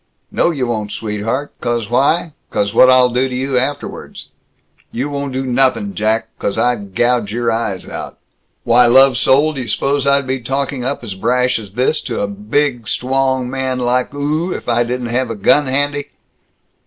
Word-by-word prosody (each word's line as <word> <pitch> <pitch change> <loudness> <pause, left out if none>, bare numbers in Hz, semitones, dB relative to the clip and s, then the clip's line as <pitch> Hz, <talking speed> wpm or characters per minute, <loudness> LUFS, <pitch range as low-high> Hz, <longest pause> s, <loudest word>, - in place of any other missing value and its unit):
"No, - - +2
you 140 -7 -1
won't, 110 -3 -3
sweetheart, 115 +6 -3
'cause 120 -3 -1
why? 145 - +1 0.2
'Cause 100 +1 -1
what'll 130 +1 +6
I - - -8
do 130 +2 +1
to 125 - -5
you 130 +1 -2
afterwards?" 145 +3 -5 0.6
"You 135 +5 -3
won't 140 -1 -3
do 130 +1 -3
nothin', 135 - +1
Jack, 110 - 0
'cause 100 - -2
I'd 105 -6 -1
gouge 120 -3 +1
your 120 +1 0
eyes 110 -5 -3
out." - - -7 0.5
"Why, 120 +1 +5
lovesoul, 135 +4 +4
d' - - -9
you 125 - -4
suppose 140 +5 0
I'd 140 0 +3
be 130 +1 -2
talking 135 +1 -3
up 135 0 -3
as 105 -4 -5
brash 125 +5 +1
as 100 -3 -11
this 130 +7 +1
to 120 -4 -3
a - - +1
bid, 115 +4 -1
stwong 130 +1 0
man 130 0 -2
like 125 0 0
oo 155 +5 -1
if - - -6
I 120 0 +2
didn't 120 0 -2
have 130 -1 0
a 115 - -3
gun 135 +8 +3
handy?" 145 +2 -1
125 Hz, 180 wpm, -17 LUFS, 115-135 Hz, 0.6 s, what'll